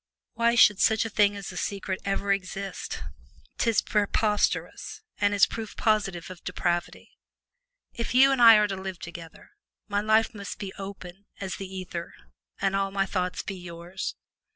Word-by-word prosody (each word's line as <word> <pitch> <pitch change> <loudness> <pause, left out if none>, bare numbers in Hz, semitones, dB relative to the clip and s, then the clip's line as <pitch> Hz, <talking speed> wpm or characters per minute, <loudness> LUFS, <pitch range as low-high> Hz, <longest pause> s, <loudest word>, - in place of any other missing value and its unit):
Why 235 0 +2
should 205 -4 +6
such 220 0 +3
a 225 - -4
thing 205 0 +3
as 200 -1 -6
a - - -9
secret 195 -1 -3
ever 200 0 +1
exist? 195 0 -5 0.6
'Tis 230 -2 +2
preposterous, 210 - 0 0.2
and 205 0 +3
is 205 -1 +5
proof 225 -2 -7
positive 195 -5 0
of 180 - -11
depravity. 175 -1 -2 0.8
If 235 +1 -4
you 270 +2 +7
and 270 -2 +1
I 230 -1 +10
are 210 0 +3
to 195 - -3
live 190 -1 -6
together, 170 - -10 0.4
my 205 -1 0
life 220 +2 +3
must 200 -2 -7
be 195 -2 -6
open 195 0 -9
as 190 -2 -4
the 195 - -6
ether 180 -2 -6 0.4
and 195 0 +1
all 195 0 +1
my 195 0 0
thoughts 180 -1 -2
be - - -5
yours. 175 0 -6
195 Hz, 165 wpm, -27 LUFS, 185-210 Hz, 0.8 s, I